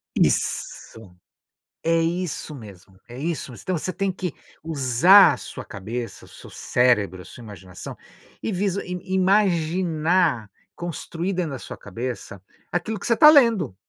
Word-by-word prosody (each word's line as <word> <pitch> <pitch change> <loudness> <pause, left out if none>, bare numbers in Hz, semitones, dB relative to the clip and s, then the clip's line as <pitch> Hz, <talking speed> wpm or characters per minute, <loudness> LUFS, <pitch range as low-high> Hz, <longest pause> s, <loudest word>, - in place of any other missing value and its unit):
Isso, 100 -5 -1 0.7
é 165 0 +2
isso 170 -2 -3
mesmo, 95 -5 -13
é 120 +1 -10
isso 155 -2 -3
mas 115 - -12
você 185 0 -2
tem 195 -1 -1
que 180 -4 -5 0.3
usar 155 +5 +6
a - - -5
sua - - -9
cabeça, 115 +5 -6
o - - -18
seu - - -13
cérebro, 105 -7 +1
a - - -13
sua 120 - -12
imaginação 95 -4 -10 0.5
e 220 - -2
vizua 195 +1 -1
e 180 - -5
e 185 +1 -6
imaginar 175 - +1 0.3
construir 175 +2 -4
dentro 175 -5 -2
da 130 - -5
sua - - -9
cabeça 115 -2 -7 0.3
aquilo 195 +4 -2
que - - -8
você 230 - +2
tá 300 - +8
lendo. 230 - +4
165 Hz, 150 wpm, -23 LUFS, 120-185 Hz, 0.7 s, tá